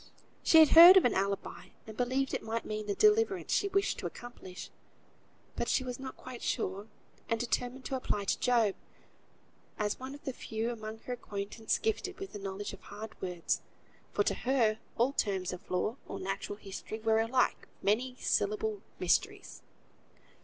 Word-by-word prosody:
She 325 Hz, -, +5 dB
had 315 Hz, -1 st, +9 dB
heard 345 Hz, +3 st, +11 dB
of 380 Hz, -, +6 dB
an 245 Hz, -, +3 dB
alibi, 195 Hz, +1 st, -2 dB, 0.2 s
and 220 Hz, -, -9 dB
believed 260 Hz, +3 st, 0 dB
it -, -, -1 dB
might 225 Hz, +1 st, -3 dB
mean 215 Hz, 0 st, -4 dB
the 200 Hz, -, -1 dB
deliverance 425 Hz, -3 st, +3 dB
she 405 Hz, -, +2 dB
wished 395 Hz, 0 st, 0 dB
to -, -, -3 dB
accomplish; 240 Hz, -7 st, -10 dB, 0.8 s
but -, -, -2 dB
she 260 Hz, -, +2 dB
was 250 Hz, -1 st, -5 dB
not 265 Hz, 0 st, -7 dB
quite 255 Hz, -2 st, -9 dB
sure, 200 Hz, -2 st, -2 dB, 0.4 s
and 230 Hz, -, +1 dB
determined 245 Hz, +2 st, -2 dB
to 270 Hz, -, -2 dB
apply 210 Hz, -5 st, -2 dB
to -, -, 0 dB
Job, 235 Hz, -5 st, +3 dB, 1.0 s
as 210 Hz, -1 st, -1 dB
one 260 Hz, +2 st, -6 dB
of 290 Hz, -, -14 dB
the 265 Hz, -, -3 dB
few 225 Hz, 0 st, -3 dB
among 220 Hz, -1 st, -7 dB
her 250 Hz, -, -4 dB
acquaintance 210 Hz, -1 st, -3 dB
gifted 225 Hz, -, -2 dB
with 390 Hz, 0 st, -7 dB
the 205 Hz, -, -6 dB
knowledge 195 Hz, +1 st, -5 dB
of -, -, -11 dB
hard 215 Hz, +2 st, -8 dB
words, 180 Hz, -2 st, -1 dB, 0.5 s
for 205 Hz, -, +2 dB
to -, -, +1 dB
her, 235 Hz, -4 st, +1 dB, 0.2 s
all 250 Hz, +4 st, +2 dB
terms 190 Hz, -7 st, -1 dB
of 180 Hz, -, -10 dB
law, 195 Hz, +7 st, -1 dB
or -, -, -6 dB
natural 195 Hz, +1 st, -4 dB
history, 205 Hz, +1 st, -7 dB
were 220 Hz, 0 st, +2 dB
alike 240 Hz, +3 st, +1 dB, 0.2 s
many 240 Hz, +6 st, +1 dB
syllabled 210 Hz, 0 st, 0 dB, 0.2 s
mysteries. 395 Hz, -, 0 dB
225 Hz, 175 wpm, -31 LUFS, 205-260 Hz, 1.0 s, heard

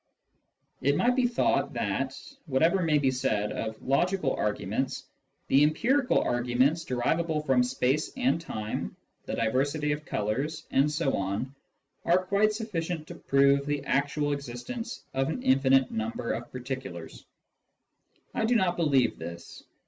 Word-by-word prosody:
It 140 Hz, +1 st, +2 dB
might 245 Hz, +1 st, +3 dB
be 255 Hz, -1 st, +3 dB
thought 240 Hz, -, +1 dB
that, -, -, -2 dB, 0.3 s
whatever 160 Hz, +7 st, +3 dB
may 160 Hz, -3 st, +3 dB
be 135 Hz, -2 st, +2 dB
said 110 Hz, -5 st, 0 dB
of 110 Hz, 0 st, -4 dB
logical 165 Hz, +2 st, +1 dB
arguments, 105 Hz, +5 st, -2 dB, 0.4 s
the 135 Hz, -, +4 dB
empirical 245 Hz, -, +2 dB
arguments 125 Hz, +6 st, +1 dB
derivable 155 Hz, +5 st, 0 dB
from 135 Hz, -4 st, +3 dB
space 130 Hz, +4 st, 0 dB
and 255 Hz, -10 st, +1 dB
time, 110 Hz, -9 st, -4 dB, 0.3 s
the -, -, -2 dB
diversity 140 Hz, +6 st, 0 dB
of 150 Hz, +1 st, -2 dB
colours, 140 Hz, +9 st, -2 dB
etc., 135 Hz, -, +1 dB, 0.6 s
are 180 Hz, +2 st, +2 dB
quite 205 Hz, +3 st, +3 dB
sufficient 175 Hz, -7 st, -3 dB
to -, -, -6 dB
prove 140 Hz, 0 st, +3 dB
the 145 Hz, -1 st, -2 dB
actual 145 Hz, +1 st, 0 dB
existence 140 Hz, -, -6 dB
of 135 Hz, +2 st, 0 dB
an 250 Hz, +10 st, -4 dB
infinite 135 Hz, 0 st, +4 dB
number 115 Hz, +2 st, -3 dB
of 120 Hz, +1 st, -5 dB
particulars. 130 Hz, -9 st, -6 dB, 1.1 s
I -, -, 0 dB
do 240 Hz, +2 st, +2 dB
not 185 Hz, -5 st, +2 dB
believe 140 Hz, -7 st, +2 dB
this. 85 Hz, +1 st, -8 dB
140 Hz, 135 wpm, -28 LUFS, 125-165 Hz, 1.1 s, the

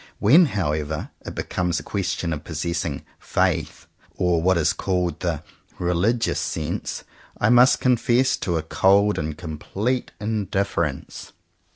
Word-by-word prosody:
When 155 Hz, -, +6 dB
however 75 Hz, -, -2 dB
it -, -, -7 dB
becomes 90 Hz, -2 st, -1 dB
a -, -, -10 dB
question 90 Hz, -4 st, -2 dB
of 75 Hz, +1 st, -6 dB
possessing 80 Hz, -2 st, -3 dB, 0.2 s
"faith," -, -, -1 dB, 0.3 s
or 90 Hz, -1 st, +2 dB
having 80 Hz, -, -4 dB
what 95 Hz, -1 st, +4 dB
is 85 Hz, -, +2 dB
called 90 Hz, -2 st, -1 dB
the 85 Hz, -4 st, -2 dB, 0.3 s
"religious 90 Hz, +7 st, +1 dB
sense," -, -, -3 dB, 0.4 s
I 105 Hz, -, +3 dB
must 125 Hz, +2 st, +6 dB
confess 125 Hz, 0 st, +3 dB
to 85 Hz, -3 st, -1 dB
a 80 Hz, -, -2 dB
cold 100 Hz, +5 st, +3 dB
and 75 Hz, -1 st, -3 dB
complete 95 Hz, +9 st, -3 dB
indifference. 100 Hz, -8 st, -2 dB
90 Hz, 135 wpm, -23 LUFS, 80-105 Hz, 0.4 s, When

